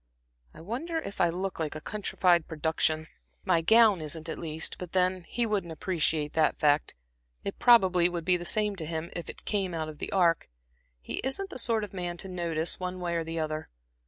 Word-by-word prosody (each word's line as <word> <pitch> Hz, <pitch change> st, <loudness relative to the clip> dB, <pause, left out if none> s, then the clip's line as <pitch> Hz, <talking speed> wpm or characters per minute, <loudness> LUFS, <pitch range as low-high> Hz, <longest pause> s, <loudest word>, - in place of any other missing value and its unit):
I -, -, -11 dB
wonder 265 Hz, -, -3 dB
if 205 Hz, -10 st, -4 dB
I 175 Hz, -, +5 dB
look 185 Hz, +2 st, -3 dB
like 155 Hz, -2 st, -2 dB
a -, -, -4 dB
countrified 180 Hz, -3 st, +1 dB
production. 160 Hz, 0 st, 0 dB, 0.4 s
My 170 Hz, -3 st, +3 dB
gown 220 Hz, 0 st, +6 dB
isn't, 155 Hz, +1 st, -3 dB
at 160 Hz, -, -4 dB
least; 160 Hz, -1 st, -3 dB
but 180 Hz, -2 st, -7 dB
then 185 Hz, -1 st, +1 dB
he 240 Hz, 0 st, 0 dB
wouldn't 200 Hz, -6 st, -1 dB
appreciate 160 Hz, -3 st, -1 dB
that 160 Hz, -1 st, +2 dB
fact. 145 Hz, 0 st, +2 dB, 0.5 s
It 200 Hz, -, -5 dB
probably 185 Hz, -8 st, +6 dB
would 170 Hz, -2 st, -4 dB
be 180 Hz, 0 st, +4 dB
the 175 Hz, -, -7 dB
same 210 Hz, +3 st, 0 dB
to 160 Hz, -, -3 dB
him, 165 Hz, +1 st, -4 dB
if 170 Hz, -, -5 dB
it -, -, -9 dB
came 195 Hz, -4 st, -1 dB
out 160 Hz, -1 st, -2 dB
of 150 Hz, -, -10 dB
the -, -, -4 dB
Ark; 175 Hz, -5 st, +2 dB, 0.5 s
he -, -, -4 dB
isn't 320 Hz, +10 st, -1 dB
the 255 Hz, -, -5 dB
sort 230 Hz, -2 st, +1 dB
of 205 Hz, -, -7 dB
man 175 Hz, -2 st, -3 dB
to 190 Hz, -, -6 dB
notice, 170 Hz, -3 st, -2 dB
one 185 Hz, 0 st, -4 dB
way 175 Hz, -1 st, -2 dB
or 165 Hz, -1 st, 0 dB
the 165 Hz, +1 st, -5 dB
other. 155 Hz, -1 st, -3 dB
175 Hz, 210 wpm, -29 LUFS, 160-195 Hz, 0.5 s, gown